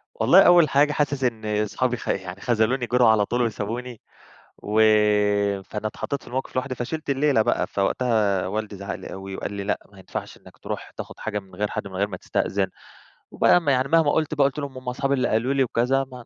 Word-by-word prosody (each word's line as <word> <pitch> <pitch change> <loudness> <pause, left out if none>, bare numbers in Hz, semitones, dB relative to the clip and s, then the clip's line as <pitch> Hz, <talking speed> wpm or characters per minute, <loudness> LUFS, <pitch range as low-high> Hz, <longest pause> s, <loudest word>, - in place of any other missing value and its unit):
والله 190 +2 +6
أول 175 -4 +6
حاجة 145 +2 +3
حاسس 140 -2 -1
إن 110 -3 0
صحابي 125 +3 -1
خ - - -10
يعني 95 0 -3
خذلوني، 120 +2 +1
جروا 125 -1 +4
على 105 -2 +4
طول 120 +4 -1
وسابوني، 115 +1 -3 0.6
وفأنا 105 -1 +2
اتحطيت 140 +6 -4
في - - -18
الموقف 130 +2 -4
لوحدي، 130 0 -2
فشلِت 145 +5 -5
الليلة 140 -3 +3
بقى. 120 - 0
فوقتها 100 -2 0
والدي 105 +1 -4
زعق 100 +1 -5
لي - - -9
أوي 95 0 -7
وقال 100 - -5
لي:" 100 0 -4
لأ، 105 - -1
ما 100 - -18
ينفعش - - -7
إنك - - -18
تروح - - -6
تاخد - - -8
حاجة 105 -2 -3
من 95 -2 -16
غير 105 +2 -1
حد - - -4
من 95 - -10
غير 100 +2 0
ما 90 -3 -7
تستأذن." 95 +1 -1 0.6
وبقى 175 - +4
يعني 130 -1 +2
مهما 160 -2 +4
قُلت 155 -1 0
بقى، 145 -2 +3
قُلت 140 +2 -5
لهم: 140 -2 -6
"هُم 125 -1 -5
صحابي 140 +1 0
اللي 130 -2 +1
قالوا 115 +5 +1
لي 135 -1 +3
وكذا." 130 +3 +1
ما 125 -2 -10
115 Hz, 205 wpm, -24 LUFS, 105-135 Hz, 0.6 s, والله